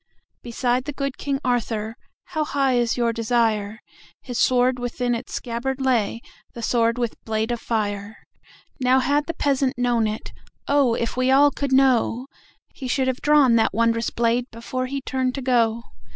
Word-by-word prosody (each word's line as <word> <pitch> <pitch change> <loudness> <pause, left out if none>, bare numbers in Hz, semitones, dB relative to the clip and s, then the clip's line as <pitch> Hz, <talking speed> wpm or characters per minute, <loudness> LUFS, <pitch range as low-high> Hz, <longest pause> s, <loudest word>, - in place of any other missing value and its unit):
Beside 245 +1 -1
the 295 - -4
good 275 -1 -4
King 275 -1 -2
Arthur(How 235 +6 -3
high 275 -3 +1
is 240 -1 +1
your 235 -1 +1
desire?)His 230 +1 -2
sword 250 0 +3
within 245 0 -2
its 235 +2 -5
scabbard 250 +3 -3
lay, 240 -4 0 0.3
The 235 - -7
sword 230 0 +1
with 240 -2 -3
blade 220 +1 -1
of 240 -1 -3
fire. 205 -2 -3 0.6
Now 255 0 +3
had 285 +3 +1
the 335 - -3
peasant 270 -4 0
known 240 -3 +1
it(Oh, 245 +4 -2
if 230 -1 -2
we 255 +1 +1
all 285 +2 +6
could 280 0 -3
know!)He 260 0 0
should 260 +1 0
have 260 - -3
drawn 290 -6 +5
that 220 -2 +1
wondrous 230 0 +1
bladeBefore 235 +2 -2
he 275 +1 -4
turned 260 -1 -1
to 275 - -4
go. 235 -2 +2
245 Hz, 150 wpm, -23 LUFS, 230-265 Hz, 0.6 s, all